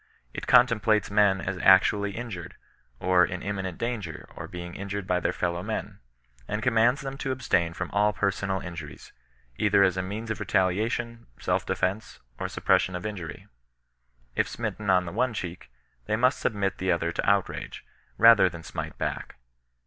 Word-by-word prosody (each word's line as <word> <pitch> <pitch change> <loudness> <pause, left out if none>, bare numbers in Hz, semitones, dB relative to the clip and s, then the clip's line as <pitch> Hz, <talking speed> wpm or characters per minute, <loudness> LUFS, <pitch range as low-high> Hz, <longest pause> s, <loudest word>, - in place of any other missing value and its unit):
It - - -6
contemplates 115 -4 +4
men 100 -2 +4
as 90 -1 -3
actually 100 +2 +5
injured, 110 -8 -6 0.4
or 90 -1 +4
in 90 0 -2
imminent 95 -3 -3
danger 110 -9 -4
of - - -7
being 85 0 -7
injured 100 0 -5
by 90 -1 +1
their - - 0
fellow 85 0 -2
men; 110 +3 -5 0.5
and 105 - -3
commands 120 +2 +3
them 135 0 -6
to 135 - -2
abstain 90 -10 0
from 95 +1 -5
all 105 +1 +3
personal 100 -1 -1
injuries, 85 -6 -9 0.4
either 100 -1 +4
as 95 -1 +2
a - - +1
means 105 +4 -5
of - - -3
retaliation, 110 +5 0
self - - -1
defence, 100 +4 -2 0.2
or - - -2
suppression 95 - +1
of 90 - -5
injury. 90 -8 -6 0.9
If - - +1
smitten 105 -2 -4
on 90 -1 +4
the 85 - -5
one 125 +3 0
cheek, 90 -6 -6 0.4
they - - +1
must 125 +4 +2
submit 100 -3 -1
the 95 0 +1
other 85 -1 0
to 85 - 0
outrage, 100 -1 -1 0.3
rather 115 -4 +7
than 85 -1 -10
smite 70 - -6
bac&. - - -4
100 Hz, 165 wpm, -27 LUFS, 90-110 Hz, 0.9 s, rather